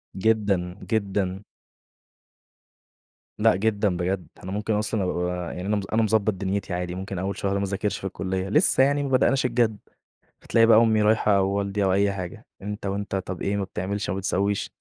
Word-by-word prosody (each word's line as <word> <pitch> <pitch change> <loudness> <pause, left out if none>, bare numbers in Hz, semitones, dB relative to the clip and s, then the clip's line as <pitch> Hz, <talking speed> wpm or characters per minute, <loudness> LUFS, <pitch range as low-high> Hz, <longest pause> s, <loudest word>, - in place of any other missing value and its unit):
جدًا، 100 -3 +1
جدًا. 100 -2 -1 2.0
لأ، 115 +1 +4
جدًا 100 -2 +1
بجد، 90 +1 -2 0.2
أنا 95 - -6
ممكن 105 +2 -1
أصلًا 105 -1 0
أبقي 90 - -1
ب 90 0 -1 0.3
يعني 90 - -5
أنا 105 0 +1
أنا 110 - +3
مضبط 110 0 +2
دنيتي 95 0 -3
عادي، 90 0 -3
ممكن 95 0 -5
أول 95 +1 -3
شهر 100 -1 -1
ما - - -1
أذاكِرش 100 +1 -2
في 95 - -4
الكُلّيّة، 95 0 -3
لسه 150 - +4
يعني 145 +1 +2
ما 140 - -2
بدأناش 130 0 +3
الجد، 115 -3 +1 0.7
هتلاقي 115 -1 +4
بقى 110 -1 +7
أمي 110 -2 +4
رايحة 105 -2 +3
والدي 100 +1 0
أو 95 - +2
أي 100 +1 +2
حاجة، 90 -3 -7 0.2
أنت 105 0 -5
وأنت 100 0 -2
طَب 95 -2 -4
إيه 100 +1 0
ما 100 - -1
بتعملش 95 +2 -3
ما 95 - -2
بتسويش، 100 +1 -1
100 Hz, 180 wpm, -25 LUFS, 95-110 Hz, 2.0 s, بقى